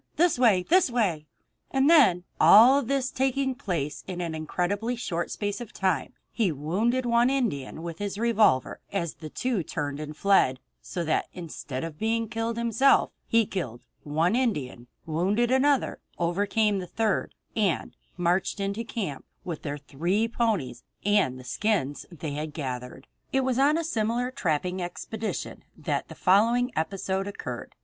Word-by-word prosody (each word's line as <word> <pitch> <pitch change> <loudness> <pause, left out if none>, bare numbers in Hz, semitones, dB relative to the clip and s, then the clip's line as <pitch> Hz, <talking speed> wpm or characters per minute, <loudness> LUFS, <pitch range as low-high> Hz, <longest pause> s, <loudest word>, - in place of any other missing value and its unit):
This 340 -6 +3
way! 210 -8 +5
This 360 - +4
way!" 190 -11 0 0.4
And 270 +1 +2
then 265 - +6 0.2
all 255 +7 +8
this 270 +1 -1
taking 265 0 0
place 170 - -3
in 180 -2 -5
an 170 -2 -3
incredibly 185 +9 -1
short 175 -8 -3
space 205 +1 -3
of 235 - -8
time 185 -8 0 0.2
he 220 -7 +1
wounded 205 - 0
one 235 +1 +4
Indian 180 - -2
with 170 -1 -6
his 200 -1 -3
revolver 215 - +2
as 170 -5 -2
the 155 - -9
two 245 - -1
turned 145 -2 -4
and 150 0 -7
fled; 190 -10 +3 0.2
so 175 - -4
that, 155 -1 0
instead 155 -6 -6
of 160 -2 -6
being 225 +1 0
killed 225 +1 -3
himself, 235 +4 +3 0.2
he 230 -1 +3
killed 130 - -5 0.2
one 160 +7 +1
Indian, 145 - -1 0.2
wounded 195 +10 +1
another, 270 +1 +2 0.2
overcame 200 +4 +1
the 180 - -6
third, 220 +1 -1 0.2
and 205 -7 0 0.2
marched 180 +3 +1
into 200 +3 -2
camp 195 - -4 0.2
with 170 -4 -5
their 145 0 -4
three 170 +10 -1
ponies 220 - -1 0.2
and 205 -11 +3
all - - -9
the 130 - -10
skins 160 -3 -1
that 170 -5 -15
they 155 - -3
had 150 +1 -4
gathered. 130 -2 -5 0.3
It 265 - +2
was 260 -1 0
on 290 +3 +4
a 335 - -1
similar 240 -3 -1
trapping 180 - -1
expedition 215 +5 -5
that - - -2
the - - -10
following 230 +6 +3
episode 190 +3 -2
occurred. 200 - -6
200 Hz, 160 wpm, -27 LUFS, 160-235 Hz, 0.4 s, all